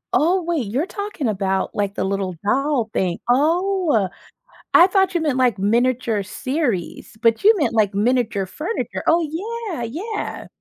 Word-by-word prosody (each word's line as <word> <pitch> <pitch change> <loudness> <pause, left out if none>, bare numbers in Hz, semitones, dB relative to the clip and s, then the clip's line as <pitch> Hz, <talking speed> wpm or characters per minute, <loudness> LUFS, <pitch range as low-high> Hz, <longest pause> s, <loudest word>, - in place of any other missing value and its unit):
Oh 355 +4 +3
wait, 325 -9 -1
you're 270 - -1
talking 405 - -4
about, 195 -2 -1
like, 200 -1 -1
the - - -2
little 190 -2 -2
doll 260 0 +1
thing. 180 -2 -1
Oh, 320 - +2 0.7
I 355 - +8
thought 385 -1 +2
you 340 - 0
meant 290 -5 0
like 245 -6 +2
miniature 230 0 +1
series, 245 - -3
but 230 - +2
you 435 +2 +7
meant, 295 - 0
like, 210 -3 +2
miniature 215 -2 +1
furniture. 310 - -4
Oh 335 +1 +4 0.5
yeah, 245 -8 -4
yeah. 370 - -5
250 Hz, 155 wpm, -21 LUFS, 205-330 Hz, 0.7 s, I